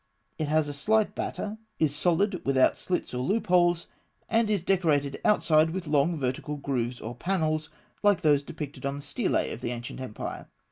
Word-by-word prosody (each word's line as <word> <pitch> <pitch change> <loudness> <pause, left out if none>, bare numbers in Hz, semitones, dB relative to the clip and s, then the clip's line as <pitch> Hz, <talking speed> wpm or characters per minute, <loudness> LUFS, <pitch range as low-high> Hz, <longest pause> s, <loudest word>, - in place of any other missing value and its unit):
It 155 - 0
has 155 0 +2
a 145 - -4
slight 215 +9 +2
batter; 210 +1 -4 0.2
is 150 -3 +1
solid, 180 +4 +1
without 135 -1 +3
slits 180 -7 -2
or 125 - -2
loopholes; 175 - +2 0.4
and 225 -1 +2
is 205 -5 +1
decorated 155 -8 +1
outside 160 -7 +4
with 180 +2 -4
long 150 +2 +2
vertical 135 +2 -2
grooves 125 -3 -2
or 115 +2 -6
panels, 155 +1 -1 0.3
like 205 -3 +4
those 145 -2 +4
depicted 150 -1 -7
on 140 0 -1
the 145 - -7
stelae - - 0
of - - -7
the - - -2
ancient 120 +1 -6
empire. 125 -5 -6
155 Hz, 175 wpm, -28 LUFS, 140-180 Hz, 0.4 s, outside